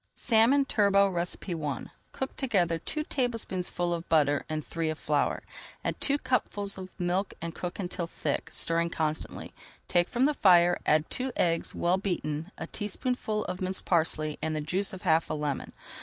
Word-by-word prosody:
SALMON 240 +5 +4
TURBOT 200 -4 +3 0.3
I 155 -7 -3 0.3
Cook 265 - -4
together 180 -11 +1
two 305 - -2
tablespoonfuls 190 - -1
of 165 - -11
butter 145 -3 +3
and 155 -1 -3
three 165 -1 -2
of 155 - -2
flour. - - 0 0.4
Add - - -2
two 285 0 +3
cupfuls 205 -7 0
of 185 0 -7
milk 180 +2 -1
and 165 0 -5
cook 180 +2 -5
until 180 -2 -3
thick, - - -2
stirring 170 0 +1
constantly. 155 -2 -3 0.3
Take 175 -1 +2
from 245 +2 +2
the 300 - +3
fire, 175 -7 +5
add 155 +1 +4
two 260 +1 0
eggs, 165 -1 +1
well 175 +2 +2
beaten, 165 -3 -2
a - - -4
teaspoonful 215 +1 -2
of 185 - -4
minced 185 0 -2
parsley 155 -3 +1
and 160 -1 -1
the - - -1
juice 185 +6 -1
of 190 - -9
half 165 -3 +3
a - - -1
lemon. 150 -2 -3
180 Hz, 170 wpm, -29 LUFS, 165-205 Hz, 0.4 s, fire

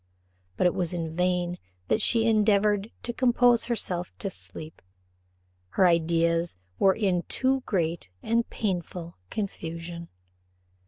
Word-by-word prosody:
But - - +2
it 180 - +4
was 175 -1 -1
in 165 -2 -4
vain 180 0 0 0.3
that 215 - +2
she 230 +1 +4
endeavoured 210 -1 +3
to 240 - -3
compose 245 -1 +4
herself 180 -7 -2
to 195 - -2
sleep; 160 -3 -6 1.0
her 190 - +6
ideas 170 0 +2 0.2
were 195 -1 +5
in 190 -5 +1
too 265 0 +1
great 170 - -1
and 230 +1 +1
painful 180 -4 -3
confusion. 170 -4 -5
180 Hz, 120 wpm, -27 LUFS, 170-215 Hz, 1.0 s, her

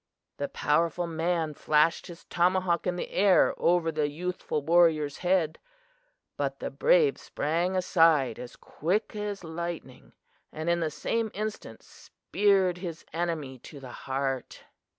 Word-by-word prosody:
"The 140 - -2
powerful 165 +3 0
man 165 -1 -1
flashed 150 +3 +2
his 170 -1 -11
tomahawk 180 0 +1
in 180 - 0
the 175 - -5
air 195 -1 +4
over 170 -1 +2
the 150 -1 0
youthful 170 -1 -3
warrior's 160 -3 +3
head, 175 -3 +1 0.8
but - - -2
the - - -5
brave 480 -3 +3
sprang 170 +5 -1
aside 165 - +3
as 125 - -9
quick 190 +8 -2
as 205 -2 -4
lightning, 165 -5 -7 0.4
and 160 +2 -2
in 170 - +1
the 160 -2 0
same 225 +8 -2
instant 215 +1 -5
speared 190 -3 0
his 170 -3 -7
enemy 160 -6 -3
to 145 +4 -11
the 130 -2 -10 0.2
heart. 135 -1 -3
170 Hz, 135 wpm, -28 LUFS, 150-180 Hz, 0.8 s, air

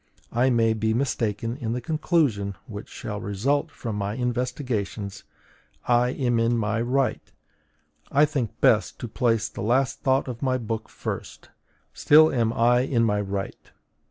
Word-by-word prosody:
I 125 +3 +2
may 115 -2 +3
be 110 0 0
mistaken 115 -2 -1
in 115 -4 -3
the 125 - -2
conclusion 135 - 0
which 105 -1 -8
shall 105 -2 -6
result 135 +11 0
from 115 -7 -5
my 100 +1 -2
investigations: 125 -5 -3 0.6
I 120 0 +4
am 120 -3 0
in 115 +1 +2
my 110 +1 0
right. 130 +2 0 0.9
I 145 +2 +5
think 140 -8 -3
best - - +3
to - - -4
place 115 0 +1
the - - -8
last 125 +5 +1
thought 135 0 +2
of 125 -2 -6
my 130 -2 +1
book 115 -2 -4
first: - - -7 0.4
still 155 +2 +6
am 115 -3 +1
I 120 +1 +3
in 125 -2 +1
my 105 -2 +1
right. 100 0 -5
120 Hz, 155 wpm, -25 LUFS, 110-130 Hz, 0.9 s, still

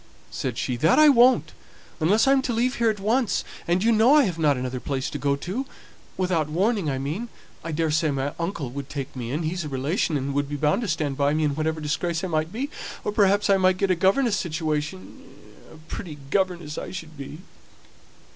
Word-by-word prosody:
said - - -3
she. 125 - -2
"That 160 +8 +3
I 305 0 +8
won't. 255 -1 +5 0.5
Unless 205 +10 +3
I'm 270 0 +5
to 250 - -2
leave 245 +3 0
here 235 -1 +3
at 210 -2 -2
once. 225 +2 +1 0.2
And 175 +3 +2
you 230 - +4
know 230 +6 +5
I 300 - +6
have 180 -8 -2
not 145 -4 +3
another 125 0 -3
place 135 0 -3
to - - -4
go 140 -1 +1
to 195 - -4 0.5
without 175 -5 0
warning, 190 +1 +1
I 135 - -1
mean. 155 - -4 0.3
I 165 - -4
daresay 155 0 +1
my 140 0 -2
uncle 170 -7 -3
would 140 +1 -6
take 140 -2 -6
me 120 -2 -5
in; 150 +6 -2
he's 170 +2 -2
a 150 - -5
relation, 145 +4 0
and 140 +1 -3
would 145 0 -1
be 145 - -3
bound 150 - +1
to 230 - -2
stand 155 -5 -1
by 145 +1 +2
me 155 - +1
in 150 -2 +1
whatever 160 +2 -1
disgrace 160 +3 -2
I - - -1
might 155 0 -1
be; 265 +7 -4 0.3
or - - -1
perhaps 205 0 +3
I 195 -1 +5
might 185 -1 +3
get 195 0 +1
a - - +3
governess's 200 +7 +2
situation 150 - -3 0.5
a - - -13
pretty 155 0 -8
governess 175 -5 -1
I - - -6
should 165 -4 -8
be!" 140 +1 -8
165 Hz, 215 wpm, -24 LUFS, 145-200 Hz, 0.5 s, I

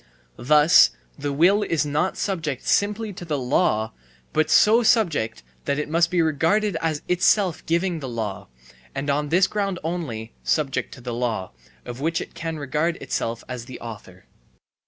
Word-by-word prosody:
Thus 150 +5 +6 0.3
the 145 0 -2
will 180 +9 +4
is 165 -6 0
not 150 +5 -1
subject 155 -9 -3
simply 210 +1 +1
to 175 - -9
the 155 -4 -2
law, 125 -4 +1 0.4
but 155 0 +2
so 220 +7 +6
subject 170 - +1 0.2
that 140 - 0
it 150 - -2
must 170 +2 +2
be 175 -1 +2
regarded 165 +7 +1
as 155 -2 -1
itself 180 0 +2
giving 170 +1 0
the 135 -3 -6
law 110 -5 -4 0.5
and, 140 +1 -1
on 145 +1 -1
this 180 +4 +4
ground 195 -2 -2
only, 140 -10 -4
subject 145 -4 0
to 130 - -13
the 120 0 -5
law 115 -6 -2 0.3
(of 120 +2 -7
which 165 +2 0
it - - -8
can 165 -1 -4
regard 150 +4 -1
itself 115 -5 -3
as 125 -2 -6
the 130 - -9
author). 105 -6 -10
155 Hz, 165 wpm, -23 LUFS, 130-175 Hz, 0.5 s, Thus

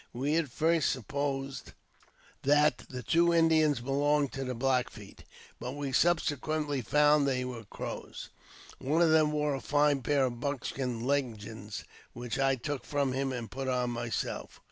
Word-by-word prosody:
We 140 +5 0
at 165 -4 0
first 160 +4 +2
supposed 135 +2 -3 0.7
that 145 +2 +3
the 125 -1 -6
two 170 +5 +3
Indians 160 -5 +3
belonged 145 +2 +1
to 135 - -4
the 125 -1 -3
Black 125 +1 +1
Feet, 105 -3 -13 0.4
but 125 +2 -5
we 145 -1 -4
subsequently 150 -2 +1
found 150 +3 +4
they 125 -2 0
were 120 -3 -6
Crows. - - -7 0.5
One 150 +6 +2
of 165 - +4
them 155 -1 +4
wore 150 -1 0
a 135 - -3
fine 145 -1 +2
pair 140 +1 +2
of 120 -2 -4
buckskin 125 -3 -3
leggings, 110 -6 -3 0.3
which 120 0 -4
I 135 0 +3
took 140 +2 -4
from 140 -3 -1
him 135 0 -1
and 120 -3 -5
put 135 +1 -4
on 125 -1 0
myself. 120 -1 -4
135 Hz, 160 wpm, -30 LUFS, 125-150 Hz, 0.7 s, found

